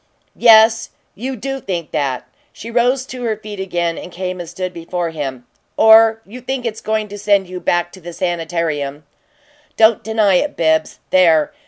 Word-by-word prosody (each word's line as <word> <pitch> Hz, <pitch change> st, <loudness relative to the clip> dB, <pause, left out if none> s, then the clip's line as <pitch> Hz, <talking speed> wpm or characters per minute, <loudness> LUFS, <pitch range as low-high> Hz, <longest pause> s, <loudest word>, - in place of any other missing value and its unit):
"Yes, 225 Hz, 0 st, +5 dB, 0.2 s
you 260 Hz, +5 st, -5 dB
do 270 Hz, +4 st, -4 dB
think 175 Hz, -8 st, -5 dB
that!" 135 Hz, -3 st, -2 dB, 0.2 s
She 230 Hz, -, -10 dB
rose 250 Hz, +2 st, +1 dB
to 255 Hz, -1 st, -8 dB
her 225 Hz, -3 st, -1 dB
feet 210 Hz, -2 st, -9 dB
again 175 Hz, -3 st, -2 dB
and 180 Hz, -, -10 dB
came 185 Hz, 0 st, -5 dB
and 170 Hz, -2 st, -7 dB
stood 185 Hz, +1 st, -5 dB
before 170 Hz, 0 st, -4 dB
him. 135 Hz, -5 st, -5 dB, 0.3 s
"Or 225 Hz, 0 st, +6 dB
you 245 Hz, +6 st, -11 dB
think 255 Hz, 0 st, -4 dB
it's 220 Hz, -2 st, -4 dB
going 215 Hz, 0 st, -1 dB
to 205 Hz, +1 st, -8 dB
send 200 Hz, -2 st, +2 dB
you 180 Hz, 0 st, -7 dB
back 175 Hz, 0 st, 0 dB
to 185 Hz, -, -14 dB
the 175 Hz, +1 st, -8 dB
sanitarium. 165 Hz, -5 st, -3 dB, 0.7 s
Don't 220 Hz, 0 st, +4 dB
deny 215 Hz, -4 st, +2 dB
it, 295 Hz, +9 st, -2 dB
Bibbs. 160 Hz, -1 st, +1 dB
There! 165 Hz, -5 st, +4 dB
190 Hz, 175 wpm, -18 LUFS, 170-225 Hz, 0.7 s, Or